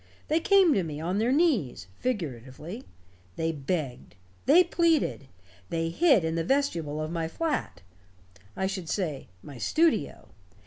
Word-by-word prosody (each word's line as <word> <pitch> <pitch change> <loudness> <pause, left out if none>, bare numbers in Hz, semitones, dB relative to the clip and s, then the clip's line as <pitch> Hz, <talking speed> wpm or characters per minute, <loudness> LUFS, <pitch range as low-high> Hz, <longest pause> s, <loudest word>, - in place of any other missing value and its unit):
They 315 - +3
came 385 -3 +5
to 195 - +2
me, 155 -4 -5
on 180 +5 -1
their 230 +3 +2
knees, 260 - +1
figuratively. 165 - -4 0.5
They 165 0 -1
begged. 145 - -4 0.3
They 335 +6 +7
pleaded. 330 - +1 0.4
They 165 0 -1
hid 275 - +4
in 160 - -1
the 165 0 -1
vestibule 165 - 0
of 155 +1 -3
my 165 -1 -2
flat. 305 - -3 0.7
I 190 - 0
should 190 -4 -4
say, 160 -9 -2 0.2
my 140 -4 -10
studio. 310 - +1
175 Hz, 140 wpm, -27 LUFS, -, 0.7 s, They